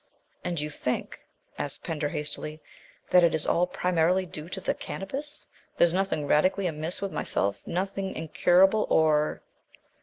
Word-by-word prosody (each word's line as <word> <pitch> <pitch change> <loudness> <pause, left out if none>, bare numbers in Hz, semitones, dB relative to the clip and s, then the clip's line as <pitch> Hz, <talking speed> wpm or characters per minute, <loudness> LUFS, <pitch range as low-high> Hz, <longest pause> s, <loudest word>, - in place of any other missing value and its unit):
"And 175 -3 -2
you 150 +1 -3
think," 125 -3 -3 0.4
asked 145 - -5
Pender 155 -3 -2
hastily, 150 +1 -4 0.5
"that 180 -1 +7
it 165 -2 +4
is 155 - +3
all 175 +1 +2
primarily 180 +1 +1
due 155 -1 -8
to 190 - -4
the 190 - 0
Cannabis? 290 +10 -6 0.3
There - - +6
is 170 - 0
nothing 190 -5 0
radically 185 +7 +2
amiss 165 +3 -2
with 195 - -2
myself 100 0 -1
nothing 190 +2 -2
incurable, 180 +6 +3
or 155 -1 +2
175 Hz, 150 wpm, -27 LUFS, 155-190 Hz, 0.5 s, that